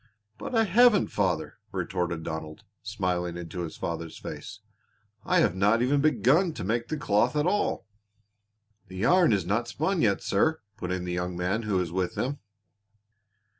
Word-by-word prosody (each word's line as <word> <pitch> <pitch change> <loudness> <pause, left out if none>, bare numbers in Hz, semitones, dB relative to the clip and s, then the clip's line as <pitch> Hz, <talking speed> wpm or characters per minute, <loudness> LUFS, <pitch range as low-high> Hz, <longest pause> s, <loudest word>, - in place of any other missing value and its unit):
"But - - -5
I 225 - +5
haven't, 220 +1 +5
father," 95 -4 -1
retorted 90 -3 -2
Donald, 80 -1 -6 0.2
smiling 90 -6 -2
into 85 +1 -7
his 85 -2 -6
father's 85 -1 -5
face. - - -8 0.7
"I - - +3
have - - +2
not 105 +5 +3
even 140 +3 +2
begun 155 +3 +3
to - - -5
make 115 +5 -1
the 155 - -3
cloth 120 0 +1
at 150 0 +1
all." 195 - 0 1.0
"The 95 0 -10
yarn 175 - +4
is 100 -5 +1
not 110 +6 0
spun 160 +8 -1
yet, 100 -3 +2
sir," 160 +11 +1
put 90 - -5
in 90 -1 -2
the 90 - -3
young 90 0 -3
man 95 +5 0
who 105 -4 -1
was 90 -3 -1
with 90 0 -2
them. 140 +3 -2
100 Hz, 170 wpm, -27 LUFS, 90-145 Hz, 1.0 s, I